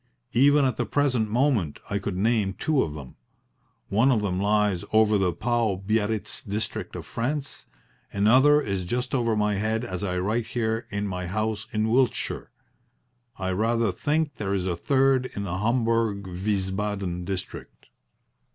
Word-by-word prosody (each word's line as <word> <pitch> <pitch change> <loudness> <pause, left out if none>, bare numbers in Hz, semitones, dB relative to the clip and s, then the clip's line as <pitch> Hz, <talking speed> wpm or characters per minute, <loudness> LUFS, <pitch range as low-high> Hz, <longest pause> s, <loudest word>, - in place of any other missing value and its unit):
Even 140 +4 +5
at 130 - 0
the - - 0
present 130 -7 +1
moment 115 - +1
I 100 - -1
could 100 -2 -4
name 105 -1 +1
two 150 +5 +1
of 75 -2 -3
them. 70 -4 -10 0.7
One 115 +7 +4
of 110 -5 +2
them 90 -2 -1
lies 105 -3 +2
over 110 -1 +4
the 95 -3 +2
Pau 115 0 0
Biarritz 110 0 -1
district 105 +2 -4
of - - -6
France. 140 +4 -3 0.4
Another 130 +9 +5
is 100 -9 -2
just 125 +4 -2
over 115 -4 +1
my 105 -1 +1
head 110 +3 -1
as 90 -4 -5
I 90 -2 -1
write 110 +5 -1
here 115 -2 -2
in 100 0 -2
my 90 -2 -4
house 110 +3 -2
in 110 +1 0
Wiltshire. 125 0 0 0.9
I 95 -1 -2
rather 115 +2 +1
think 145 - -1
there 100 -2 -1
is 95 -2 -1
a 90 -2 -1
third 135 +5 +2
in 100 - -3
the 90 -1 -3
Homburg 115 -2 +1
Wiesbaden 95 -1 -2
district. 95 0 -7
110 Hz, 160 wpm, -26 LUFS, 95-120 Hz, 0.9 s, Even